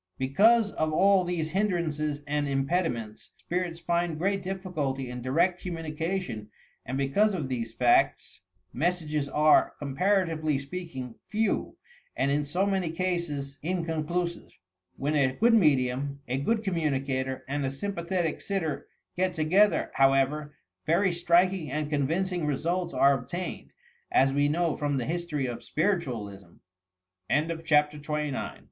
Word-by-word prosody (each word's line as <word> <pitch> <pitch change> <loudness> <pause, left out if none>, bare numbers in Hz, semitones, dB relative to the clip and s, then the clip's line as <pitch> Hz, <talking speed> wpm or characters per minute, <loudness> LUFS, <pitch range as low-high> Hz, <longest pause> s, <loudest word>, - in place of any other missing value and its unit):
Because 205 - +4
of 155 0 -1
all 195 +4 +4
these 170 -3 -2
hindrances 155 -7 -1
and 145 0 -1
impediments, 135 -6 -2
spirits 175 -1 -3
find 170 -1 0
great 195 +4 0
difficulty 160 -9 -3
in 125 0 -6
direct 170 +8 +1
commiinication 165 - -3 0.4
and 130 +2 -2
because 195 +10 +2
of 150 -7 -3
these 115 -3 -4
facts, 130 +3 +2 0.3
messages 155 -2 -1
are, 150 +2 +4
comparatively 155 0 +1
speak 165 +3 -7
ing, 125 -2 -5 0.2
few, 220 -1 -1 0.4
and 140 - +1
in 145 +1 +1
so 175 +7 0
many 190 -4 0
cases 165 -5 -3
inconclusive. 170 0 -2 0.5
When 145 +3 -1
a 135 -3 +2
good 230 - +3
medium, 140 - +2
a 130 +2 -1
good 220 +10 0
communicator 135 -7 -1
and 145 +1 -2
a 135 - 0
sympathetic 170 +2 -2
sitter 175 -7 -3 0.3
get 185 0 0
together, 185 +6 +3
however, 135 +2 +2 0.3
very 180 +4 +3
striking 175 -1 +2
and 150 +2 -3
convincing 165 +4 0
results 170 +5 -1
are 140 +2 +5
obtained, 140 +8 -5 0.4
as 135 +1 +4
we 145 +1 +2
know 165 +1 +1
from 145 -1 -1
the 125 - -1
history 165 -4 -2
of 120 -2 -4
Spiritualism 115 - -2 0.8
I - - +1 0.2
CHAPTER 150 -2 +2
XXX 150 0 -2
HYPNOTISM - - -3
A - - -5
155 Hz, 135 wpm, -28 LUFS, 140-180 Hz, 0.8 s, are